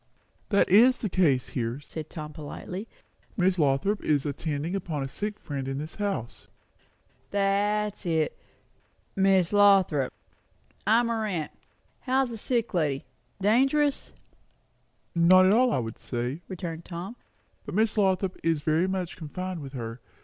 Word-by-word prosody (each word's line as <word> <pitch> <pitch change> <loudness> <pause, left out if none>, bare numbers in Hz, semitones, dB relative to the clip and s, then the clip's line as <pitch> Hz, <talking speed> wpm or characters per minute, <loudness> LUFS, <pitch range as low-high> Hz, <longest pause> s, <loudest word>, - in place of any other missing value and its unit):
"That 200 - +3
is 240 +7 +6
the 215 - -3
case 150 -9 +2
here," 120 +1 -3
said 155 +1 -8
Tom 155 -2 -7
politely. 180 +7 -7 0.5
"Miss 185 -1 +2
Lothrop 150 +8 +1
is 145 -2 +1
attending 150 +3 -3
upon 160 -7 -3
a - - -3
sick 210 +9 -4
friend 140 -3 -5
in 135 0 -3
this 155 +2 -6
house." 195 - -4 0.8
"That's 205 0 0
it 160 -2 +1 0.8
Miss 190 -2 +3
Lothrop. 195 -9 +4 0.8
I'm 235 +1 +4
her 225 -1 -1
aunt. 165 -7 -3 0.5
How's 260 -1 +1
the 230 - -5
sick 235 0 -1
lady? 150 -6 0 0.3
Dangerous?" 270 +8 +2 1.0
"Not 180 +2 +6
at 190 - +5
all, 250 +2 +4
I - - +1
should 115 - -8
say," 125 +6 -3
returned 170 -3 -6
Tom; 180 +7 -7 0.5
"but - - -7
Miss 220 +1 +2
Lothrop 190 -2 +1
is 165 -2 +1
very 160 +4 +2
much 185 -2 -3
confined 180 +2 -5
with 135 -1 -8
her. 115 -2 -5
180 Hz, 140 wpm, -27 LUFS, 150-205 Hz, 1.0 s, is